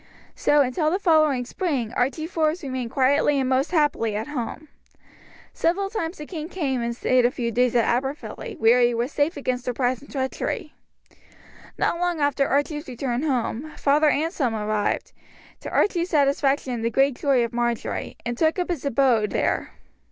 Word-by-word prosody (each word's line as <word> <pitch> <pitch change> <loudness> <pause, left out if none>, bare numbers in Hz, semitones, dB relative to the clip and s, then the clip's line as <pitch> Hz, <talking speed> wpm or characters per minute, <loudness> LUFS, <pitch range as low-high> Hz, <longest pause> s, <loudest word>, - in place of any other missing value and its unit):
So 295 0 +3
until 280 +4 +1
the 360 - +1
following 310 -9 +3
spring 250 - -2
Archie 275 +6 0
Forbes 320 0 -1
remained 260 -3 -3
quietly 275 +3 +2
and 260 - 0
most 265 +3 +1
happily 290 - +1
at 220 +7 -3
home. 295 +2 -5 0.9
Several 390 +4 0
times 355 -6 -3
the 300 - -7
king 315 -1 -6
came 275 -10 -2
and 235 0 -2
stayed 255 +1 +2
a 240 - +4
few 240 -2 -3
days 245 +1 +1
at 235 - +4
Aberfilly, 275 - -3
where 235 -2 +5
he 240 0 +3
was 240 +4 -1
safe 295 +3 0
against 255 -3 -2
surprise 250 0 -1
and 285 - -15
treachery. 265 -2 -3 1.0
Not 340 - 0
long 350 -2 0
after 285 -1 +1
Archie's 295 +2 -1
return 245 0 -2
home, 275 0 -2
Father 295 +2 +3
Anselm 290 - 0
arrived, 210 -1 -1 0.5
to - - -7
Archie's 355 -3 +1
satisfaction 280 -3 +2
and 230 -2 -4
the 230 - +1
great 270 +4 +3
joy 270 -4 +3
of 235 - -8
Marjory, 240 -1 -2
and 240 0 -2
took 315 +7 +1
up 360 0 -1
his 320 -6 -3
abode 250 -6 +2
there. - - -1
275 Hz, 175 wpm, -24 LUFS, 245-310 Hz, 1.0 s, where